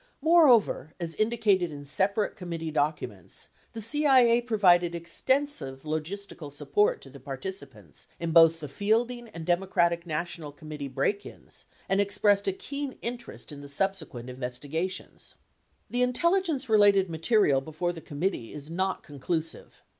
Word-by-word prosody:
Moreover, 275 - +4
as 170 -2 -3
indicated 215 -6 +1
in 145 -1 -8
separate 200 +8 0
committee 165 -3 -5
documents, 150 0 -3 0.2
the 225 - -5
CIA 250 -1 +4
provided 180 -7 +3
extensive 170 - -1
logistical 155 +1 -5
support 145 +8 +1
to 135 - -13
the 140 - -12
par 135 +1 -6
ticipants 115 - -10
in 170 -1 -2
both 165 0 +6
the 150 - -5
Fielding 230 - 0
and 165 -5 -8
Democratic 175 -1 +1
National 160 -1 -4
Com 155 +2 -13
1107 145 -3 -5
rnittee - - -21
break 200 +9 0
ins - - -12 0.2
and 195 +1 +2
expressed 205 0 +2
a - - +3
keen 280 +7 -5
interest 240 -7 -6
in 145 -1 -9
the 140 - -10
subsequent 155 -7 -2
investigations.* 140 +9 -5 0.5
The 245 - -1
intelligence 315 +2 +1
related 205 -3 +5
material 165 - +2
before 160 +5 -3
the 165 - -9
committee 150 - -3
is 150 +1 -8
not 190 +2 -1
con 145 -2 -12
clusive. 160 +2 -4
175 Hz, 145 wpm, -28 LUFS, 150-215 Hz, 0.5 s, both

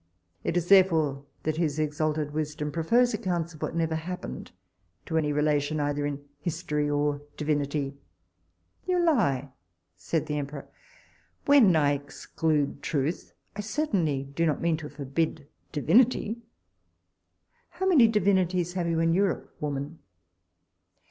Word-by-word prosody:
It 170 - 0
is 175 -1 -1
therefore 160 -8 +4 0.2
that 155 0 -1
his 155 -3 0
exalted 155 0 -1
wisdom 150 0 -3
prefers 235 +10 +2
accounts 175 -5 -2
of 155 - -14
what - - -3
never 165 -1 0
happened, 175 +3 -5 0.5
to 160 - -4
any 155 -2 +2
relation 150 0 +1
either 145 0 0
in 145 0 -5
history 150 -2 -2
or 145 0 0 0.2
divinity 145 -2 -1 0.9
You 365 -1 +2
lie, 195 - +2 0.4
said 160 -3 -2
the 150 0 -2
emperor; 140 0 -6 0.8
when 260 - +6
I 145 -2 +4
exclude 145 +1 -2
truth, 145 +3 -2 0.2
I 210 - -3
certainly 200 - 0
do 140 +5 -1
not 150 - 0
mean 165 -1 +1
to 150 -1 -7
forbid 145 +1 -2 0.2
divinity 225 - +2 1.3
How 380 - -4
many 310 -12 +6
divinities 185 -4 +1
have 180 -2 -1
you 165 -1 +1
in 165 0 +3
Europe, 195 +1 0
woman? 145 +2 -4
155 Hz, 130 wpm, -27 LUFS, 145-180 Hz, 1.3 s, when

